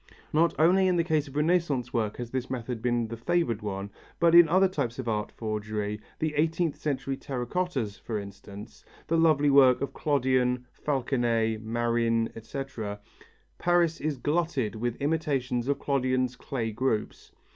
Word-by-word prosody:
Not 165 +2 +3
only 185 +4 +4
in 180 - +2
the 170 - +2
case 155 -3 0
of 135 - -12
Renaissance 150 -6 +1
work 110 -3 -1
has 120 -1 -6
this 130 -1 -3
method 120 -2 -4
been 120 -1 0
the 115 - -4
favoured 115 -1 0
one 100 -1 -4 0.3
but 170 -1 +4
in 170 -2 +8
other 190 +3 +5
types 140 -10 -3
of 130 -2 -5
art 105 -2 -1
forgery, 105 -1 -3 0.2
the 155 -1 -1
eighteenth 160 +1 +1
century 135 -2 -2
terra 130 -2 -4
cottas, 130 - -2
for 110 - -4
instance, 100 +1 -10 0.2
the 165 - 0
lovely 155 -3 +4
work 130 -2 +6
of 140 - -3
Clodion, 130 -3 +1
Falconnet, 120 -5 0
Marin, 115 0 0
etc. 115 -3 -6 0.6
Paris 175 -2 +2
is 150 -2 -1
glutted 145 -5 0
with 120 +1 -2
imitations 140 -5 -1
of 140 - +1
Clodion's 130 -2 0
clay 120 -3 -3
groups. 110 -1 -2
130 Hz, 155 wpm, -28 LUFS, 115-155 Hz, 0.6 s, in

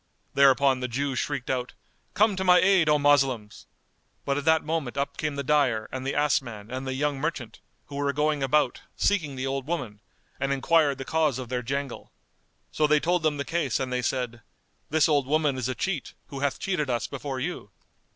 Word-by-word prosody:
Thereupon 135 -1 +4
the 125 - -2
Jew 135 +3 -2
shrieked 135 0 -2
out, 125 -1 -2 0.4
"Come 210 0 +4
to 190 - -2
my 180 -1 +6
aid, 185 -4 +4
O 150 - +5
Moslems!" 135 -7 +1 0.6
but 140 - 0
at 145 0 -3
that 160 0 +4
moment 155 -5 -3
up 140 0 -2
came 155 -2 -3
the 140 - -3
dyer 130 -6 +2
and 130 0 -4
the 140 - -1
ass 145 -2 +3
man 110 -4 -10
and 130 +1 -4
the 130 - -2
young 145 0 -1
merchant, 150 -7 -4 0.3
who 140 - -8
were 140 0 +1
going 150 0 0
about, 135 -1 +1
seeking 160 -9 0
the 130 0 -3
old 135 0 -3
woman, 125 -12 -4 0.4
and 140 0 -1
enquired 145 +1 +2
the 135 - -6
cause 155 -5 +1
of 130 -2 -6
their 125 -1 -1
jangle. 140 +2 -4 0.6
So 155 - +2
they 150 0 +4
told 175 +3 +1
them 155 -2 +1
the 140 - -3
case 165 -7 -1
and 130 -1 -3
they 125 - 0
said, 120 -1 -2 0.5
"This 155 0 +3
old 145 -4 +2
woman 150 -1 +2
is 130 -1 -2
a 130 - -2
cheat, 190 - -3
who 140 - -6
hath 140 0 0
cheated 170 -8 -2
us 120 -1 0
before 140 -1 -5
you." 130 - -4
140 Hz, 210 wpm, -26 LUFS, 130-150 Hz, 0.6 s, my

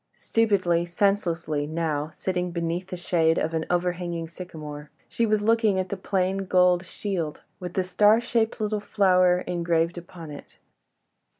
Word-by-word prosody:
Stupidly, 190 -7 +1
senselessly, 170 -5 0
now, 155 -2 -2
sitting 180 +1 -2
beneath 170 +1 -3
the 180 - -6
shade 165 -2 +2
of 160 - -1
an 160 0 -2
overhanging 175 -1 -1
sycamore, 155 -4 -9 0.2
she 230 - 0
was 215 -1 +1
looking 225 -2 +3
at 185 0 -1
the 200 - -2
plain 190 0 -1
gold 180 -1 +4
shield, 170 -6 -4 0.2
with 180 -1 -7
the 190 - +2
star 205 +4 +4
shaped 230 -2 0
little 215 -1 -1
flower 185 -3 +3
engraved 170 -1 0
upon 170 -3 -11
it. 145 - -11
180 Hz, 145 wpm, -25 LUFS, 165-195 Hz, 0.2 s, gold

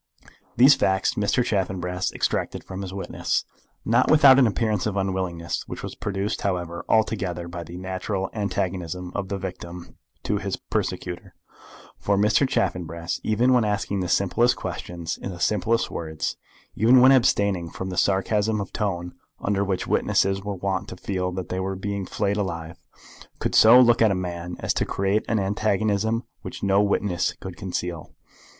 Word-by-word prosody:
These 130 +5 +8
facts 95 -5 +1
Mr. 105 +4 +1
Chaffanbrass 95 -4 -1
extracted - - -2
from 95 0 -7
his 95 -2 -5
witness, 95 0 -2 0.4
not - - +3
without 140 -3 +7
an 125 - +6
appearance 110 -2 0
of 100 -2 -2
unwillingness, 95 -3 -2
which - - -7
was - - -5
produced, 100 +1 -3
however, 85 -3 -2
altogether 95 -6 0
by 85 0 -6
the 85 +2 -9
natural 95 +1 -3
antagonism 90 -3 -3
of 100 -2 -3
the 100 - -2
victim 90 -2 -8 0.3
to - - 0
his - - -3
persecutor; 90 -1 -4 0.6
for 100 -1 +1
Mr. 105 +7 +3
Chaffanbrass, 85 -2 -2
even 120 +4 +3
when 125 -2 +4
asking 105 -1 -1
the 90 - -1
simplest 115 +7 +2
questions, 85 -1 -5
in - - -4
the 90 -2 -7
simplest 110 +5 +1
words, 80 -2 -3 0.4
even 120 +4 +6
when 130 +2 +7
abstaining 100 -9 +2
from 95 +3 -6
that 90 - -5
sarcasm 105 +2 +1
of 100 - -5
tone 90 -4 -2 0.3
under 100 0 0
which 95 -2 -2
witnesses 95 0 +1
were 100 -1 -3
wont 95 0 -2
to 95 - -8
feel 90 -1 -2
that 90 0 -5
they 95 - -2
were 95 +1 -2
being 100 0 -4
flayed 100 +1 -1
alive, 85 -3 -4 0.6
could - - -2
so 115 +3 +8
look 120 -2 +5
at 110 - +6
a 100 - +1
man 90 -1 -4
as - - 0
to - - 0
create 100 +2 0
an 115 - +1
antagonism 105 +2 0 0.2
which - - -8
no 100 0 +4
witness 100 -3 0
could 95 -2 -9
conceal. 90 -2 -5
95 Hz, 165 wpm, -24 LUFS, 90-105 Hz, 0.6 s, These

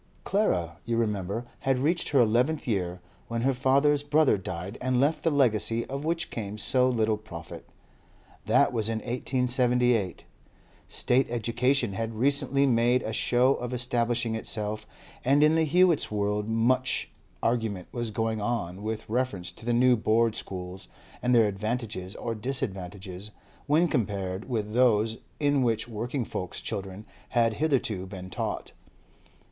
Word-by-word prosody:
Clara, 85 - 0
you 115 0 -1
remember, 105 0 -1
had 135 -1 +1
reached 160 +7 0
her 140 - +3
eleventh 125 +8 +2
year 90 -5 -1 0.3
when 115 0 -2
her 135 +1 +3
father's 140 +3 +3
brother 145 -1 +3
died 95 0 -5
and 130 0 +1
left 145 +4 +2
the 165 - +2
legacy 115 -5 +2
of 140 +2 -5
which 165 +1 -2
came 105 -2 -5
so 125 +3 +2
little 110 -3 +1
profit. 95 -7 -10 0.8
That - - +4
was 110 -2 0
in 115 - -1
1878. 125 -3 +1 0.6
State 125 +1 +1
education 120 0 +1
had 115 +3 -3
recently 140 +2 +2
made 120 0 +3
a 110 - -3
show 125 +4 +3
of 125 -1 -5
establishing 120 -1 0
itself, 110 -1 -3 0.4
and 140 +3 +4
in 155 +1 +5
the 160 0 +3
Hewetts' 175 0 +4
world 105 0 -1
much 125 +3 +1 0.3
argument 110 -6 -1
was 120 -2 -3
going 110 0 -1
on 100 -5 -2
with 110 +1 -4
reference 110 -6 -2
to 115 - -13
the - - +2
new 125 +1 +5
Board 115 0 +2
schools, 90 -1 -6 0.3
and 125 0 +3
their 115 -2 +6
advantages 105 -2 -4
or 115 - -3
disadvantages 100 -5 -4 0.4
when 155 +4 +4
compared 100 - -2
with 110 -3 -2
those 115 -2 +3 0.2
in 145 -2 +2
which 115 -3 0
working 120 +3 -3
folk's 90 -3 -5
children 95 +1 -5 0.3
had 115 -1 +4
hitherto 120 -11 0
been 95 -1 -8
taught. - - -3
115 Hz, 145 wpm, -27 LUFS, 105-130 Hz, 0.8 s, their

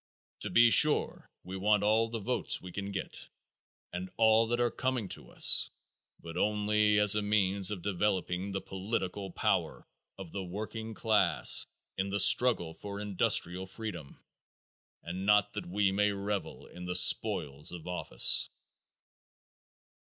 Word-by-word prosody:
To - - -4
be 120 0 +4
sure 150 +4 +2
we 95 +1 -9
want 105 +2 +1
all 110 +2 +1
the 115 - -5
votes 115 +4 -2
we 90 - -11
can 100 +2 -6
get 95 -1 -6 0.6
and 90 +1 -6
all 110 0 +3
that 120 +1 -2
are 120 -1 0
coming 130 -5 -3
to - - -6
us - - +4 0.5
but 85 0 -11
only 105 0 +1
as 105 0 +5
a 105 - 0
means 100 -2 0
of 100 -5 -5
developing 95 -1 -2
the 95 0 -4
political 95 0 -5
power - - -2 0.3
of 95 -4 -10
the 100 - -5
working 110 +4 -7
class 100 - +3 0.3
in 95 +1 -2
the 100 +1 -2
struggle 100 -4 +4
for 100 +3 -9
industrial 95 -2 0
freedom, 95 -8 -9 0.9
and 90 +3 -6
not 105 0 +2
that 105 - -7
we 100 +2 0
may 105 +2 +1
revel 100 0 -5
in 90 0 -11
the 90 0 -4
spoils 80 -8 +3
of 85 -2 -10
office. 90 0 +3
100 Hz, 145 wpm, -29 LUFS, 95-105 Hz, 0.9 s, as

